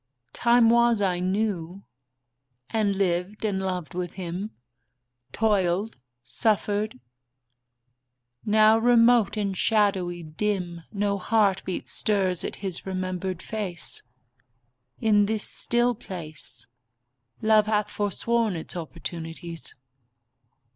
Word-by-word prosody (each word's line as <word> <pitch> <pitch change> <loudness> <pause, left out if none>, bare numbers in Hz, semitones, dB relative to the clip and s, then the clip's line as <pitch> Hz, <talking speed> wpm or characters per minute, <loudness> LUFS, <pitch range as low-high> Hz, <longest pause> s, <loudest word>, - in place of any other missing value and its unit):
Time 235 -1 +4
was 235 -1 +4
I 185 -3 +1
knew, 190 -1 -2 0.9
and 210 -3 +1
lived 190 +2 -1
and 200 -3 0
loved 185 -2 -3
with 180 -1 -4
him; 185 +2 -5 0.8
Toiled, 205 - 0 0.2
suffered. 205 - 0 1.4
Now, 215 +1 +5
remote 235 -2 +4
and 200 -2 -1
shadowy, 190 -5 +1
dim, 175 +1 -2
No 200 -1 -1
heartbeat 195 -3 +1
stirs 190 -4 +1
at - - -4
his 185 -3 -1
remembered 185 -1 -3
face. 200 -6 0 1.0
In 205 -2 +3
this 220 0 -2
still 240 +1 +1
place 155 - -7 0.8
Love 215 -1 +4
hath 210 -1 0
forsworn 215 +1 0
its 165 +2 -5
opportunities. 165 0 -6
200 Hz, 95 wpm, -26 LUFS, 180-215 Hz, 1.4 s, Now